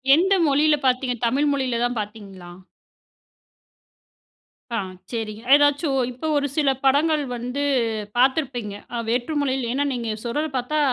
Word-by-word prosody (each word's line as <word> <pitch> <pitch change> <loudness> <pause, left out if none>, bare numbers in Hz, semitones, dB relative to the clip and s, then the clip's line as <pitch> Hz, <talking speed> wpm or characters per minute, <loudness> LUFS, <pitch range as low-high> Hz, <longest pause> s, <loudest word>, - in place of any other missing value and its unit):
எந்த 380 +5 +3
மொழியில 300 +2 +4
பாத்தீங்க? 250 -1 +1
தமிழ் 280 +5 +2
மொழியில 255 -4 -1
தான் 245 -1 -2
பாத்தீங்களா? 200 -4 -8 2.2
ஆ. - - 0 0.3
சரிங்க. 220 -2 -4
ஏதாச்சும் 290 -1 +2
இப்ப 285 +6 -4
ஒரு 285 0 +1
சில 290 -3 +3 0.2
படங்கள் 295 +2 +3
வந்து 250 +4 -3 0.5
பாத்துருப்பீங்க. 250 -5 +1 0.2
அ - - -1
வேற்று 245 +6 -1
மொழியில 260 -3 -1
ஏன்னா 280 +2 +1
நீங்க 235 -2 -3
சொல்றத 295 +7 -1
பாத்தா, 300 +5 -1
260 Hz, 125 wpm, -23 LUFS, 235-290 Hz, 2.2 s, மொழியில